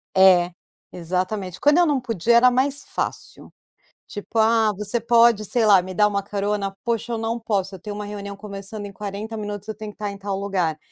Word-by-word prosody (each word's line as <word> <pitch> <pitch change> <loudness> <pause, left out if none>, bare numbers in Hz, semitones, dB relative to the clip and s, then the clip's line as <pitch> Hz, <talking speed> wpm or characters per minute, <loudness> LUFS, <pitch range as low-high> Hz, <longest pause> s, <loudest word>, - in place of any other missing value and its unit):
É, 180 -2 +5 0.4
exatamente, 185 +2 -3
quando 295 +4 +4
eu 350 - +4
não 285 -3 +2
podia 235 -2 +1
era 250 +1 +6
mais 270 +3 0
fácil. - - -5 0.6
Tipo: 215 +2 -4
"Ah, 220 -1 +4
você 210 +3 -2
pode 235 -2 +4
sei 230 +2 +1
lá 195 -3 +6
me 185 +1 -7
dar 210 +3 +4
uma 200 -1 -1
carona? 200 -1 -2
Poxa 235 0 -1
eu 230 - -1
não 225 +1 -2
posso, 200 -4 -2
eu - - -11
tenho 205 +4 -7
uma 210 - -5
reunião 200 -1 -6
começando 200 0 -8
em 200 - -9
40 210 +2 -6
minutos 205 -1 -6
eu 220 - -5
tenho 215 0 -7
que - - -25
tá 210 -1 -3
em 200 - -7
tal 195 -1 -4
lugar." 185 -6 -1
205 Hz, 210 wpm, -23 LUFS, 195-225 Hz, 0.6 s, era